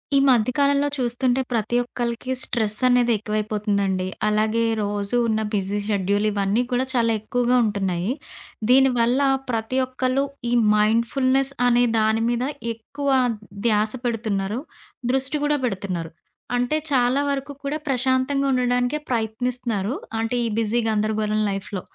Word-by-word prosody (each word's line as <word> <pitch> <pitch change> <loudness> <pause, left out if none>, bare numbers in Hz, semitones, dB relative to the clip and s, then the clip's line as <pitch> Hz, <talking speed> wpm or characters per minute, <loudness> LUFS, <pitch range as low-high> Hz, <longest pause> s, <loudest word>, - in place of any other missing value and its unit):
ఈ - - +6
మధ్య 245 -2 +4
కాలంలో 285 0 +3
చూస్తుంటే 250 +1 +1
ప్రతి 230 +1 0
ఒక్కళకి 240 +1 -4
స్ట్రెస్సనేది 240 +2 +2
ఎక్కువైపోతుందండి. 210 -3 -1 0.2
అలాగే 215 +2 +1 0.2
రోజు 205 +1 -2
ఉన్న 220 -1 0
బిజీ 200 0 -1
షెడ్యూల్ 205 0 +1
ఇవన్నీ 200 +2 +1
కూడా 250 +1 +1
చాలా 230 -2 +2
ఎక్కువగా 245 +2 +1
ఉంటున్నాయి. 195 -2 -1 0.6
దీనివల్ల 250 -1 +4 0.3
ప్రతి 225 +3 -1
ఒక్కళ్ళు 255 +1 0 0.3
ఈ - - +1 0.2
మైండ్‌ఫుల్‌నెస్ 255 +5 +2 0.2
అనే 245 0 +4 0.2
దాని 220 +1 +2
మీద 240 +1 0 0.3
ఎక్కువ 280 +6 -5 0.6
ధ్యాస 215 -1 +2
పెడుతున్నారు. 215 -1 -2 0.5
దృష్టి 270 +3 +1
కూడా 295 0 +2
పెడుతున్నారు. 185 -6 -3 0.4
అంటే 245 +5 +1
చాలా 255 0 +2
వరకు 280 0 -3
కూడా 280 +2 -2
ప్రశాంతంగా 265 +1 +2
ఉండడానికే 250 +1 +1
ప్రయత్నిస్తున్నారు. 230 -2 -1 0.3
అంటే 225 +2 -1
ఈ - - 0
బిజీ 225 +1 +1
గందరగోరం 215 -1 0
లైఫ్‌లో. 195 -1 -4
235 Hz, 120 wpm, -23 LUFS, 210-255 Hz, 0.6 s, ఈ